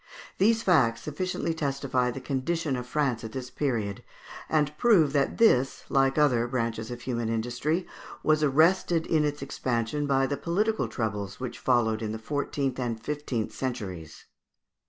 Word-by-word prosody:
These 225 +3 +3
facts 130 -11 +3
sufficiently 165 +2 -2
testify 140 -4 0
the 125 - -5
condition 140 +3 -1
of 125 0 -5
France 130 -4 0
at 110 - -7
this 125 -1 -6
period, 110 -8 -2 0.5
and 150 -1 +1
prove 175 -12 +5
that 140 -2 +1
this, 135 - +3
like 135 0 +2
other 125 -6 +3
branches 115 -3 -2
of 120 -1 -6
human 120 -3 -2
industry, 125 +10 -1 0.4
was 155 0 +3
arrested 160 +3 +3
in 155 -2 +2
its 145 -1 -2
expansion 130 +1 -2
by 135 -1 +3
the 140 +1 -2
political 210 +6 0
troubles 105 -4 -3
which 125 -1 -5
followed 115 -3 +2
in 110 -1 -3
the - - -3
fourteenth 135 +2 -2
and 120 -3 -2
fifteenth 135 -4 -3
centuries. 100 - -5
135 Hz, 155 wpm, -27 LUFS, 115-150 Hz, 0.5 s, prove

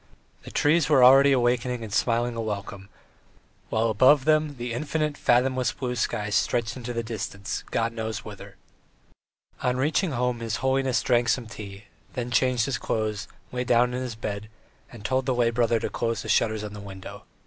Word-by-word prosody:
The - - -11
trees 155 +1 +2
were 135 -4 +5
already 135 +2 +8
awakening 125 -1 +1
and 105 -3 -7
smiling 120 0 +1
a 115 - -2
welcome, 100 -2 -5 0.8
while 110 +1 +1
above 130 +6 +5
them 155 -1 +2
the 120 0 -4
infinite, 150 +3 -1
fathomless 130 0 +2
blue 125 -2 -3
sky 105 -2 -2
stretched 115 +2 0
into 125 -1 -6
the 115 -1 -2
distance, 105 -3 -5
God 115 0 -1
knows 110 -2 -4
whither. - - -10 1.1
On 125 0 0
reaching 155 +5 +1
home 125 -1 -1
his 115 -2 -3
holiness 130 -1 +1
drank 120 -2 +2
some 125 -1 +1
tea, 100 -2 -9 0.3
then 125 -1 -4
changed 125 0 +2
his 135 -2 -2
clothes, 110 -2 -2 0.2
lay 125 0 -2
down 125 0 +3
on 125 - -2
his 125 -3 -4
bed, 105 -1 -5 0.4
and 110 -4 -12
told 130 0 0
the 130 - +1
lay 120 -1 +2
brother 115 -1 +2
to - - -2
close 115 -1 -2
the - - -7
shutters 110 -1 +2
on 105 -1 -6
the 105 - -8
windows. 95 -2 -9
120 Hz, 180 wpm, -26 LUFS, 110-130 Hz, 1.1 s, already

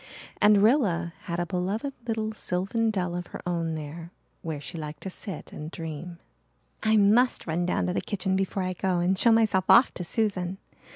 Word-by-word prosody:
And 210 -1 +6
Rilla 190 - +2
had 170 0 -3
a 175 - 0
beloved 195 +9 -2
little 220 -1 -1
sylvan 205 +4 -1
dell 180 -5 -1
of 175 0 -4
her - - -8
own 165 -2 -1
there 160 +2 -7 0.3
where 160 -3 -4
she 145 - -8
liked 150 0 -7
to 190 - -4
sit 190 -2 -7
and 150 +1 -6
dream. 165 +1 -7 0.6
"I 220 0 +3
must 220 +5 +4
run 175 +2 -1
down - - 0
to 180 - -1
the - - 0
kitchen 190 -2 -1
before 190 0 -1
I 185 0 -2
go 185 0 0
and 175 +2 +2
show 230 +5 +5
myself 220 -5 +3
off 255 - +7
to 180 - -5
Susan. 190 -2 -1
185 Hz, 190 wpm, -27 LUFS, 170-210 Hz, 0.6 s, off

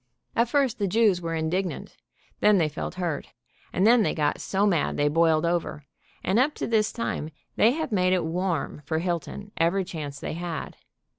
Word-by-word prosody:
At 235 0 +2
first 265 -3 +1
the 200 - +1
Jews 200 -2 +3
were 165 -1 -3
indignant, 175 +4 -2 0.4
then 210 -1 +5
they 165 -4 +3
felt 150 +4 -5
hurt, 170 -5 -3 0.4
and 190 - +1
then 235 +1 +6
they - - +1
got 150 -2 0
so 195 +1 +1
mad 175 -7 +1
they 145 - +2
boiled 160 +1 +3
over, 170 -4 -2 0.4
and 190 +5 +2
up 285 +4 +2
to - - -3
this 220 -2 +2
time 230 -9 -3 0.3
they 230 +3 +4
have 315 -2 -3
made 185 -3 +2
it 180 -3 +2
warm 170 -3 -2
for 160 +3 -2
Hilton 175 +4 -3
every 175 +3 +2
chance 150 -5 -6
they - - -4
had. 170 0 -5
180 Hz, 190 wpm, -26 LUFS, 160-210 Hz, 0.4 s, then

